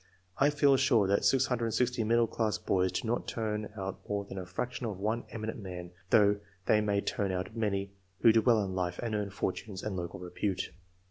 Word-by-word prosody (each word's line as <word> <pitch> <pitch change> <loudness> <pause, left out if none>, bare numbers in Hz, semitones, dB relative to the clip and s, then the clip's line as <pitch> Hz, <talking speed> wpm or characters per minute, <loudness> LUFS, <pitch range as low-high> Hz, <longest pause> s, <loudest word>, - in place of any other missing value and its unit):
I 140 - +5
feel 140 -2 +4
sure 125 -6 +4
that 100 +1 +2
660 125 -2 +2
middle 115 +1 +4
class 110 -1 -1
boys 95 -1 +1
do 95 - -2
not 120 +2 -1
turn 105 -2 -2
out 95 0 -4
more 100 -1 -1
than 95 -1 -6
a 90 - -7
fraction 120 +6 -3
of 105 -4 -4
one 110 +4 -1
eminent 110 0 -5
man, 90 -3 -7 0.2
though 105 -1 +5 0.3
they 105 - +4
may 100 -1 +1
turn 100 -1 -1
out 95 +4 -3
many 100 -3 -1 0.3
who 115 - +8
do 110 0 +4
well 115 -3 +4
in 95 -1 -3
life 90 -1 -1
and 115 -2 -2
earn 105 -1 -1
fortunes 95 0 -4
and 105 -3 -3
local 90 0 -5
repute. 90 +2 -2
105 Hz, 200 wpm, -31 LUFS, 95-115 Hz, 0.3 s, who